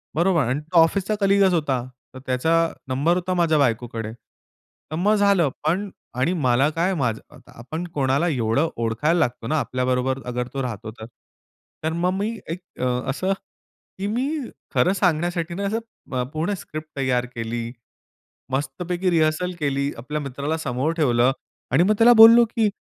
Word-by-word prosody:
बरोबर. 170 -1 +3
आणि 130 +4 0
तो 165 +4 -2
ऑफिसचा 190 +5 +2
कलीगच 195 -1 +4
होता. 140 -7 0 0.3
तर 130 - -9
त्याचा 130 +5 0 0.4
नंबर 140 +7 +1
होता 185 +1 -1
माझ्या 170 -3 +2
बायकोकडे. 115 -4 -1
तर 120 +5 -15
मग 200 +6 +2
झालं 200 -6 +3
पण 185 +6 0 0.3
आणि 130 +8 +1
मला 130 +3 +3
काय, 170 +5 0
माझ 125 -9 0 0.4
आपण 145 +9 -6
कोणाला 140 +3 +1
एवढं 130 +3 +1
ओळखायला 120 +9 +1
लागतो 120 -6 -1
ना, 155 +4 +1
आपल्याबरोबर 130 0 -1
अगर 125 0 -3
तो 135 - -2
राहतो 110 -3 -5
तर. 110 0 -10 0.8
तर 160 +1 -1
मग 180 - +3
मी 205 +2 -1 0.2
एक 165 +2 -3 0.2
अ, - - +1 0.2
असं, 185 +8 0 0.6
की 195 +1 -3
मी 240 +6 -1 0.5
खरं 185 - +3
सांगण्यासाठी 175 -2 0
ना, 195 +3 -4
असं 215 +3 0 0.4
अ, 125 - +1
पूर्ण 160 +6 -1
स्क्रिप्ट 155 -2 -8
तयार 125 -2 +1
केली. 115 0 -4 0.8
मस्तपैकी 175 +6 -2
रिहर्सल 165 +1 +1
केली. 140 -1 0
आपल्या 150 +6 -4
मित्राला 140 +3 -3
समोर 140 0 -1
ठेवलं 125 -4 +3 0.4
आणि 140 +7 +4
मग 205 +4 +3
त्याला 235 +1 +8
बोललो, 230 +1 +9
की 225 -1 0
155 Hz, 160 wpm, -23 LUFS, 125-180 Hz, 0.8 s, बोललो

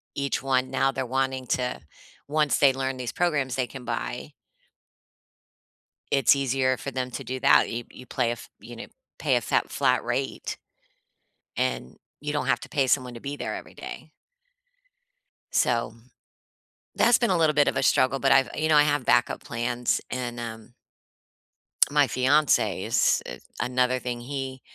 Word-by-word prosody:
each 140 0 -1
one 130 -1 0
now 135 0 +2
they're 130 -1 -3
wanting 130 +1 -1
to 125 0 -1 0.5
once 150 0 +2
they 140 - +6
learn 135 0 -2
these 125 -2 -4
programs 145 -8 0
they 130 -2 -1
can 130 +1 -10
buy - - -4 1.8
it's 135 0 +5
easier 130 -1 +1
for 140 - -6
them 130 0 -3
to - - -6
do 130 +1 -4
that. 140 +2 +5
You 120 0 -4
you 125 - -13
play 120 -1 -1
a 120 - -4 0.2
you - - -11
know, - - -8 0.3
pay - - +2
a - - -1
fat - - 0
flat - - +2
rate, - - -3 1.0
and 65 0 -2 0.2
you 150 0 -3
don't 145 -3 -1
have 130 -2 +2
to - - -10
pay 135 -2 +1
someone 125 -2 +1
to 115 - -9
be 140 +3 -5
there - - -4
every - - -11
day. - - -9 1.4
So, 115 -2 +1 1.0
that's 235 0 +5
been 235 -5 +1
a 180 - +2
little 155 -2 +3
bit 145 -1 +4
of - - -1
a - - +1
struggle, 130 +1 +3
but 135 - +3
I've 135 0 +4
you 155 +1 0
know, 155 - +5
I 150 - +8
have 145 -3 +1
backup 120 - +2
plans, 120 +1 -1
and, 120 -1 -4
um 115 +1 -8 1.2
my 145 -1 +3
fiancé 130 +6 +2
is - - +2
i 60 - -7 0.3
another 125 0 +1
thing. 120 -1 -4
He 130 0 -5
130 Hz, 170 wpm, -26 LUFS, 125-140 Hz, 1.8 s, I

